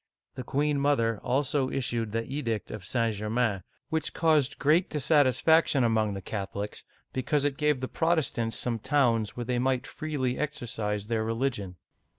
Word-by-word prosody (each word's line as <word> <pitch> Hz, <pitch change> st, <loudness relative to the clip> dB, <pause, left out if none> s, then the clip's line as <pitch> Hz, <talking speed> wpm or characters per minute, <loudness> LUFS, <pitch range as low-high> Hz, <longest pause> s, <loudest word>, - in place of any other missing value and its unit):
The 130 Hz, -, -6 dB
queen 145 Hz, +3 st, 0 dB
mother 115 Hz, -7 st, +2 dB
also 135 Hz, +2 st, 0 dB
issued 120 Hz, -4 st, -2 dB
the 115 Hz, +1 st, -1 dB
Edict 120 Hz, -6 st, -3 dB
of 105 Hz, -, -7 dB
St. 115 Hz, +3 st, 0 dB
Germain, 105 Hz, -1 st, 0 dB, 0.3 s
which 160 Hz, 0 st, -2 dB
caused 155 Hz, -4 st, +2 dB
great 160 Hz, +5 st, +3 dB
dissatisfaction 145 Hz, 0 st, +3 dB
among 110 Hz, -3 st, +1 dB
the 95 Hz, -, -6 dB
Catholics, 100 Hz, 0 st, -5 dB, 0.3 s
because 140 Hz, +3 st, 0 dB
it 145 Hz, -2 st, 0 dB
gave 150 Hz, -3 st, +1 dB
the 130 Hz, -, -2 dB
Protestants 155 Hz, -10 st, 0 dB
some 120 Hz, -2 st, -1 dB
towns 115 Hz, -5 st, +1 dB
where 120 Hz, -, -3 dB
they 125 Hz, 0 st, 0 dB
might 130 Hz, 0 st, +1 dB
freely 140 Hz, -5 st, -3 dB
exercise 115 Hz, -8 st, -3 dB
their 110 Hz, 0 st, -1 dB
religion. 115 Hz, -5 st, -2 dB
125 Hz, 155 wpm, -28 LUFS, 115-145 Hz, 0.3 s, great